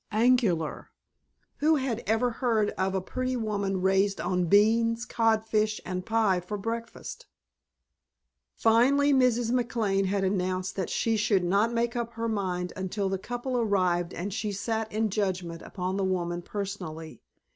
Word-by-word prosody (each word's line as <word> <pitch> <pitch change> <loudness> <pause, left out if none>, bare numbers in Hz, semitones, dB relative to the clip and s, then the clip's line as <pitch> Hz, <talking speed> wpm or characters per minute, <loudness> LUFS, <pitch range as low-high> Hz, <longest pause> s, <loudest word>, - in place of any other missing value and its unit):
Angular. 215 - +2 0.7
Who 315 +2 +3
had 260 -5 -1
ever 225 +3 +2
heard 225 -3 +1
of 190 0 -1
a 190 - 0
pretty 255 +7 -3
woman 200 -5 -1
raised 195 +1 +2
on 180 0 0
beans, 230 +5 +3
codfish, 220 -2 +1
and 185 0 -3
pie 220 -3 +2
for 180 +4 -5
breakfast? 230 - -6 1.3
Finally 270 +6 +4
Mrs. 245 -3 +3
McLane 225 -6 +1
had 195 0 0
announced 185 -1 -1
that 190 -3 -2
she 225 -1 0
should 210 -3 +2
not 200 +6 +2
make 235 +1 -1
up 235 -1 -3
her 230 0 -3
mind 185 -5 -2
until 190 +1 -2
the 190 0 -2
couple 245 +5 -4
arrived 185 -6 +1
and 190 +3 -4
she 210 +1 -2
sat 220 +2 -2
in 215 0 0
judgment 185 -5 -2
upon 185 0 -4
the 195 - 0
woman 175 -2 -1
personally. 175 -5 -6
210 Hz, 145 wpm, -28 LUFS, 185-230 Hz, 1.3 s, Finally